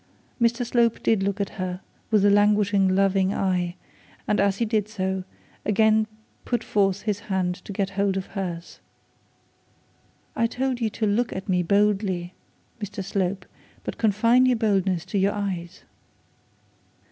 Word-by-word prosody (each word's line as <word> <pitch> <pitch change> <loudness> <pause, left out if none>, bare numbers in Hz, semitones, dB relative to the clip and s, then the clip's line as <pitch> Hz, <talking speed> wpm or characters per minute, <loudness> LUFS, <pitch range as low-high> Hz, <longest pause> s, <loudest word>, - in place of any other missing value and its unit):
Mr 235 +1 +2
Slope 235 -1 +1
did 220 -3 +2
look 200 +1 -1
at 200 - -1
her 180 -1 -3 0.3
with 210 -2 +3
a 205 - +6
languishing 205 -2 +3
loving 195 0 +2
eye, 180 -2 0 0.5
and 210 - +1
as 200 0 +2
he 235 - +1
did 215 -2 0
so, 190 -3 -2 0.4
he - - -4
again 220 +1 +3 0.4
put 240 -2 -1
forth 195 -2 +1
his 210 -2 -1
hand 190 -4 -1
to - - -8
get 195 0 -2
hold 195 -1 0
of 190 - -3
hers. 175 -3 -6 1.6
'I 230 - +2
told 255 +1 -2
you 225 - +1
to 215 +1 -2
look 220 +3 +1
at 190 +2 -6
me 180 -2 +2
boldly, 195 -1 +1 0.5
Mr 205 -1 -5
Slope; 190 -1 -2 0.4
but - - -6
confine 230 +4 +4
your 250 -2 +3
boldness 195 -6 +1
to 200 - -1
your 195 +1 +2
eyes.' 185 -3 -4
200 Hz, 155 wpm, -24 LUFS, 190-215 Hz, 1.6 s, a